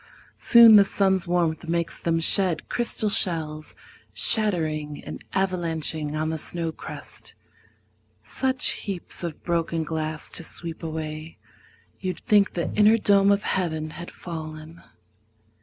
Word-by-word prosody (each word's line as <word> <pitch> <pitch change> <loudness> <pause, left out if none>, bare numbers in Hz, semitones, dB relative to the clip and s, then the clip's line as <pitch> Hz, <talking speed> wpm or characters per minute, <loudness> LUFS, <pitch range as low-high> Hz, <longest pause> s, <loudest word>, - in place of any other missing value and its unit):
Soon 230 -3 +8
the 200 - +8
sun's 190 -2 +1
warmth 170 -2 0
makes 170 0 -2
them 165 -1 0
shed 175 0 +3
crystal 235 -2 0
shells 155 -5 -1 0.4
Shattering 155 -9 0
and - - -8
avalanching 165 -5 -1
on 155 0 -1
the 160 - -3
snow 165 0 -1
crust - - -9 0.9
Such 260 -1 0
heaps 190 -3 -5
of 170 -3 -6
broken 165 -1 -1
glass 155 0 -4
to 170 - -1
sweep 165 0 -4
away 155 -1 -6 0.6
You'd 185 -1 -4
think 205 -3 +3
the 170 - -3
inner 215 +2 +5
dome 200 -2 +4
of 200 +1 +1
heaven 160 -4 -2
had 170 +2 -8
fallen. 160 -1 -9
170 Hz, 125 wpm, -24 LUFS, 160-195 Hz, 0.9 s, Soon